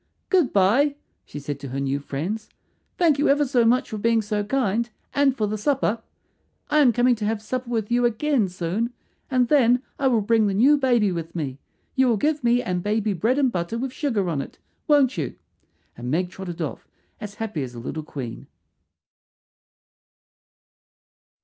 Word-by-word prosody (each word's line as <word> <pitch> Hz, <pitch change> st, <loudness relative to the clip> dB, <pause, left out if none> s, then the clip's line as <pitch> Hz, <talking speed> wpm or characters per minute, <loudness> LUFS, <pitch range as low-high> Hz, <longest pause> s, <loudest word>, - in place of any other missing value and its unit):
"Good 355 Hz, -9 st, +3 dB
bye," 235 Hz, +10 st, +3 dB, 0.3 s
she -, -, -9 dB
said 145 Hz, 0 st, -5 dB
to 140 Hz, -, -7 dB
her 135 Hz, +1 st, -4 dB
new 140 Hz, 0 st, -1 dB
friends. 170 Hz, +11 st, -4 dB, 0.5 s
"Thank 320 Hz, -5 st, +3 dB
you 290 Hz, -, +3 dB
ever 290 Hz, +1 st, +4 dB
so 250 Hz, -3 st, +2 dB
much 245 Hz, +3 st, +3 dB
for 215 Hz, -, -4 dB
being 230 Hz, +1 st, +2 dB
so 210 Hz, 0 st, -1 dB
kind, 235 Hz, -1 st, 0 dB, 0.2 s
and 275 Hz, -2 st, +2 dB
for 215 Hz, -, +1 dB
the 210 Hz, +1 st, -3 dB
supper. 235 Hz, -2 st, 0 dB, 0.7 s
"I 305 Hz, -, +4 dB
am 270 Hz, -5 st, +6 dB
coming 245 Hz, +2 st, +3 dB
to 210 Hz, -, -3 dB
have 220 Hz, 0 st, 0 dB
supper 245 Hz, +3 st, -4 dB
with 225 Hz, -2 st, -2 dB
you 245 Hz, +1 st, +3 dB
again 240 Hz, -1 st, +1 dB
soon, 185 Hz, +7 st, -2 dB, 0.4 s
and 255 Hz, -2 st, +2 dB
then 250 Hz, -2 st, +4 dB, 0.2 s
I 275 Hz, -, +2 dB
will 235 Hz, -4 st, +3 dB
bring 220 Hz, +1 st, +3 dB
the 195 Hz, -, -1 dB
new 265 Hz, +8 st, +5 dB
baby 245 Hz, -7 st, +2 dB
with 170 Hz, -1 st, -5 dB
me. 140 Hz, -5 st, -4 dB, 0.3 s
You 265 Hz, -1 st, +3 dB
will 235 Hz, -3 st, +3 dB
give 300 Hz, +4 st, 0 dB
me 240 Hz, +1 st, +3 dB
and 180 Hz, -1 st, -2 dB
baby 210 Hz, +1 st, 0 dB
bread 225 Hz, -, +1 dB
and 270 Hz, -3 st, +3 dB
butter 175 Hz, +4 st, -2 dB
with 255 Hz, +1 st, -3 dB
sugar 230 Hz, -, -1 dB
on 155 Hz, -5 st, -1 dB
it, -, -, -10 dB, 0.3 s
won't 280 Hz, -, +3 dB
you?" 145 Hz, -, -3 dB, 0.6 s
and 120 Hz, +1 st, -6 dB
Meg 175 Hz, +5 st, 0 dB
trotted 175 Hz, -3 st, -5 dB
off 150 Hz, -, -6 dB, 0.3 s
as 210 Hz, -2 st, -7 dB
happy 220 Hz, -8 st, -4 dB
as 125 Hz, -2 st, -6 dB
a -, -, -7 dB
little 145 Hz, +6 st, -5 dB
queen. 135 Hz, -6 st, -7 dB
225 Hz, 185 wpm, -24 LUFS, 180-255 Hz, 0.7 s, am